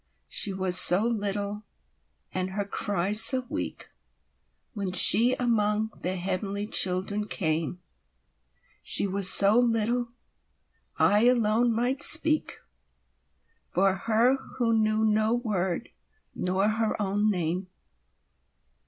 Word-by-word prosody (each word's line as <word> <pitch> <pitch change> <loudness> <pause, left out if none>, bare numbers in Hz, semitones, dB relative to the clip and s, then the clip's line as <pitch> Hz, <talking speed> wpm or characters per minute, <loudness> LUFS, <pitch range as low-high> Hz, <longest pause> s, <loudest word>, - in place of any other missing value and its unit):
She 200 - -1
was 185 -1 +3
so 180 +3 +5
little, 205 -2 -3 0.7
and 185 0 -3
her 200 0 -3
cry 200 -1 -3
so 255 +4 +5
weakWhen 200 -4 -9
she 230 +7 +5
among 220 -2 -1
the 185 +1 -3
heavenly 195 +2 -4
children 200 +1 +1
came—She 65 - -6
was 195 -1 +2
so 200 +4 +5
little—I 235 -1 -2
alone 235 -1 +1
might 245 +4 -2
speakFor 310 +1 +3 1.5
her 230 +4 +2 0.2
who 235 -2 0
knew 220 0 0
no 215 +1 +1
word 205 -4 -3 0.4
nor 185 +3 -1
her 220 0 -2
own 205 +1 -1
name. 180 -1 -3
210 Hz, 95 wpm, -26 LUFS, 185-230 Hz, 1.5 s, so